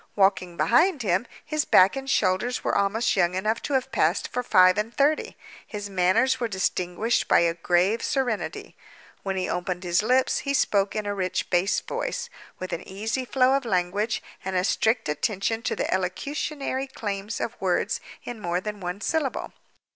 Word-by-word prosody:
Walking 190 -3 +2
behind 305 - +3
him, 190 +3 +1 0.2
his 305 -1 0
back 185 -3 +5
and 270 0 -5
shoulders 240 +1 +1
were - - 0
almost 210 +4 +1
young 180 -2 +2
enough 215 +4 0
to 285 - -4
have 265 0 0
passed 180 -5 +1
for 250 - -2
five 185 -6 +5
and 215 +2 -2
thirty. 290 +5 +1 0.3
His 205 -1 -6
manners 190 +8 +2
were 240 - 0
distinguished 190 +2 0
by - - +5
a 170 -1 +2
grave 180 +6 +1
serenity. 250 -6 -2 0.5
When 195 -1 -3
he 185 - -1
opened 180 0 -3
his 175 +1 +2
lips, 255 +4 +2
he 280 0 -1
spoke 200 -6 +1
in 215 -1 -2
a 205 - -1
rich 185 -2 -2
bass 180 +2 +2
voice, - - -4 0.3
with 185 - -5
an 165 - -3
easy 220 +7 -3
flow 255 +1 +3
of 275 - 0
language, 200 +1 -1 0.2
and 190 0 -3
a 180 - +2
strict 220 +3 +1
attention 200 +8 -1
to - - -2
the - - -1
elocutionary 270 - -2
claims 205 -4 -4
of - - -3
words - - 0 0.2
in 240 -2 -7
more 175 -1 -1
than 210 +2 -6
one 180 +2 -5
syllable. 310 -2 -2
205 Hz, 175 wpm, -25 LUFS, 185-245 Hz, 0.5 s, back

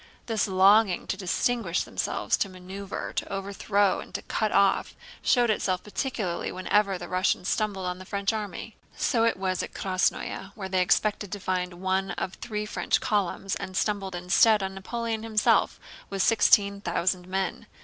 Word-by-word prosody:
This 220 -3 0
longing 195 +1 +4
to - - -2
distinguish 195 0 0
themselves, - - -1
to 200 - -1
maneuver, 190 +2 -7
to - - -3
overthrow, 200 0 +1
and - - -10
to - - -4
cut 215 -2 -1
off 200 -1 +2 0.3
showed 240 -3 +3
itself 185 -3 -1
particularly 210 -5 -3
whenever 195 +1 +1
the 175 0 -8
Russians 185 0 0
stumbled 205 -3 -1
on 180 0 -3
the 185 - -10
French 200 +2 -1
army. 215 +1 -5 0.2
So 230 -2 +2
it 230 - +1
was 185 -1 -1
at - - -7
Krásnoe, 190 0 -1
where 190 -2 -6
they 185 -1 +2
expected 205 +1 +1
to 205 - -4
find 180 -1 -2
one 190 +1 -1
of 185 - -3
the - - -14
three 210 -2 -2
French 210 - 0
columns 195 -1 -1
and 190 -1 -6
stumbled 195 -3 -1
instead 195 +4 +4
on 190 0 -3
Napoleon 225 +3 -3
himself 220 -1 +2 0.3
with 195 -1 0
sixteen 200 -3 +4
thousand 180 0 -1
men. 190 +1 -2
195 Hz, 170 wpm, -27 LUFS, 185-210 Hz, 0.3 s, longing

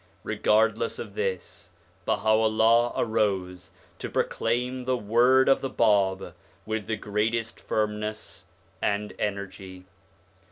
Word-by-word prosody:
Regardless 110 +1 +1
of 105 -4 -7
this, 95 -3 -4 0.3
Baha'u'llah 110 +2 +3
arose 95 -4 -1 0.3
to - - -4
proclaim 125 +2 -1
the 130 0 +1
word 120 +4 +4
of 135 - +4
the 135 - -2
Bab 100 -5 +1 0.3
with 110 -2 -3
the 110 - 0
greatest 110 +2 -2
firmness 105 0 -3 0.3
and 105 0 -1
energy. 95 -2 -5
110 Hz, 105 wpm, -26 LUFS, 100-115 Hz, 0.3 s, word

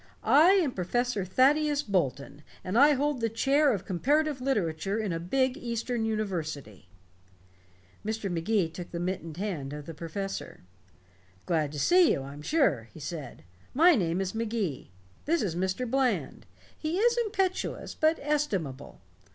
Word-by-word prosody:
I 325 +7 +6
am 350 -9 +2
Professor 240 +3 -1
Thaddeus 290 - +3
Bolton, 145 - -2 0.2
and 185 +3 -4
I 285 +5 +7
hold 285 -2 0
the 230 - +1
Chair 275 +6 +3
of 195 -5 -3
Comparative 285 - +1
Literature 200 -6 -1
in 215 -5 -2
a 165 - -2
big 260 - 0
eastern 235 -2 -2
university." 155 - -4 1.1
Mr. 220 -1 -3
Magee 175 +2 +1
took 175 +2 -9
the 170 - -5
mittened 170 -3 -4
hand 170 -9 -4
of 150 -1 -7
the 165 - -7
professor. 195 +5 -6 0.8
"Glad 155 -5 0
to 150 - -4
see 355 - +5
you, 135 - -3
I'm 140 +2 -9
sure," 150 - +1
he - - -12
said. 145 - -7 0.3
"My 340 +5 +7
name 180 - 0
is 190 -1 -3
Magee. 220 - -3 0.4
This 330 -1 +1
is 175 -5 -2
Mr. 190 +7 -1
Bland 260 +1 -1 0.3
he 315 +3 -3
is 470 +3 +3
impetuous 385 -4 -2
but 315 +1 +2
estimable. 200 - -2
210 Hz, 150 wpm, -28 LUFS, 165-280 Hz, 1.1 s, I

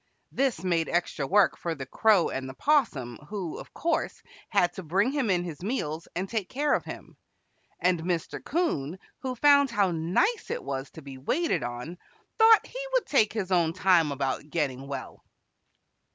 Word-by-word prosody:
This 260 -10 0
made 170 -3 +1
extra 170 -5 -1
work 200 +2 +4
for 170 -1 -4
the 135 -2 -6
Crow 205 - +3
and 130 0 -4
the 130 - -9
'Possum, 145 - +1
who, 195 -6 -4
of - - -11
course, 335 - -2 0.3
had 180 -5 +2
to - - -7
bring 190 - +1
him 275 -6 0
in 175 -2 +2
his 165 -4 -7
meals 170 - -3
and 185 +3 -2
take 210 -3 -3
care 290 +2 +1
of - - +1
him, - - -9 0.6
and 180 -2 +2
Mr. 170 -1 -3
'Coon, 185 - -1 0.2
who 260 -1 -4
found 280 +1 +5
how 205 -6 +2
nice 175 - 0
it 480 +1 -3
was 135 +1 -4
to 160 - -12
be 135 -1 -9
waited 315 - 0
on, 125 +9 -6 0.4
thought 445 0 +7
he - - -6
would - - +2
take 220 -7 +3
his 195 -4 -3
own 170 -3 +3
time 180 -4 +3
about 140 +1 -2
getting 140 -4 -2
well. 140 -1 -7
180 Hz, 180 wpm, -27 LUFS, 155-250 Hz, 0.6 s, thought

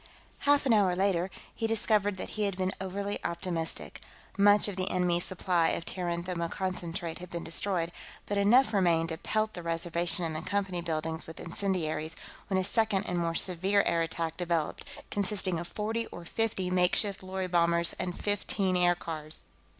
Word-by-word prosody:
Half 290 -1 +5
an 255 - +4
hour 195 -4 +4
later, 190 -1 +1 0.2
he 225 - -1
discovered 210 -3 +2
that - - -5
he 215 -1 -1
had 200 -2 -2
been 185 0 0
overly 200 +2 -3
optimistic. 170 -1 -3 0.3
Much 205 +1 +6
of 205 - -4
the 185 0 -2
enemy's 180 -1 +1
supply 180 -2 +2
of 165 - -2
Terran 175 -2 -2
thermoconcentrate 170 -1 -3
had 180 0 -8
been 170 -1 -5
destroyed, 170 0 +1 0.3
but 205 - -2
enough 215 +4 +5
remained 170 -4 +3
to 160 - -3
pelt 215 0 0
the 175 - -6
Reservation 170 +1 0
and 160 -1 -3
the 155 - -2
Company 190 -1 -1
buildings 160 -1 -3
with 160 - -9
incendiaries, 165 -4 -2 0.3
when 190 - 0
a 190 - +2
second 205 0 +2
and 180 -1 -1
more 165 -1 -1
severe 190 +3 +3
air 170 -1 +2
attack 165 0 -2
developed, 170 -3 -1 0.3
consisting 190 -3 0
of 170 - -5
forty 225 +4 -2
or 175 - -10
fifty 190 -2 0
makeshift 185 +2 +2
lorry 190 0 -3
bombers 170 -1 +2
and 180 -1 -3
fifteen 200 -2 +1
aircars. 170 -3 -1
180 Hz, 170 wpm, -30 LUFS, 170-200 Hz, 0.3 s, Much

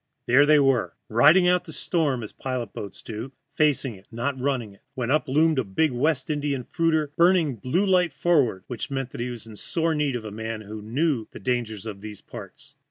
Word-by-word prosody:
There 135 +4 +5
they 155 0 +6
were, 135 -4 +2
riding 155 +11 +6
out 180 0 +3
the 160 - -9
storm, 150 - -1
as 105 - -7
pilot 125 -5 -4
boats 100 - -8
do 115 +5 -6 0.2
(facing 145 -5 +1
it, 95 -1 -16
not 125 +4 -2
running), 125 -7 -2 0.2
when 125 -1 -2
up 155 - +2
loomed 155 +2 +3
a - - +1
big 125 +10 +1
West 135 +2 0
Indian 145 -3 -1
fruiter, 160 -1 0
burning 170 -3 +4
a 120 - -8
blue 175 +10 +1
light 180 -3 +3
forward, 140 - +1
which 120 -4 -5
meant 135 -2 -3
she 120 +1 -3
was 120 -3 -7
in 110 -1 -11
sore 165 +8 0
need 150 -4 0
of 115 -2 -5
a 105 - -6
man 110 +1 -5
at 100 - -14
the - - -7
wheel 105 - -9
who - - -10
knew 135 -2 0
the - - -11
dangers 110 -2 -2
in 105 -3 -6
these 105 0 -8
parts. - - -11
130 Hz, 225 wpm, -25 LUFS, 115-155 Hz, 0.2 s, they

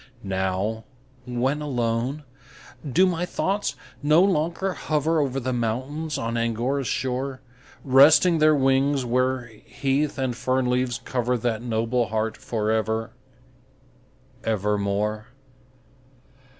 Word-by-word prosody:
Now, 95 +3 -2 0.4
when 130 +4 -1
alone, 125 +1 -1 0.7
do 185 +8 +5
my 175 -2 0
thoughts 195 +3 -1 0.3
no 150 +4 +5
longer 185 +1 0
hover 155 0 0
Over 135 -2 0
the 130 0 -2
mountains 130 +7 -2
on 115 +1 -2
Angora's 120 +4 -1
shore, 130 +1 -2 0.4
Resting 145 +6 +6
their 155 0 +5
wings, 135 0 +2
where 125 +1 0 0.2
heath 140 +2 -1
and 130 -3 -1
fern 130 +2 0
leaves 125 0 0
cover 125 -1 0
That 115 -1 -1
noble 115 0 0
heart 110 0 -1
for 110 -2 -2
ever, 110 0 -1 1.3
ever 105 -2 0
more? 105 +2 -1
125 Hz, 110 wpm, -24 LUFS, 115-145 Hz, 1.3 s, Resting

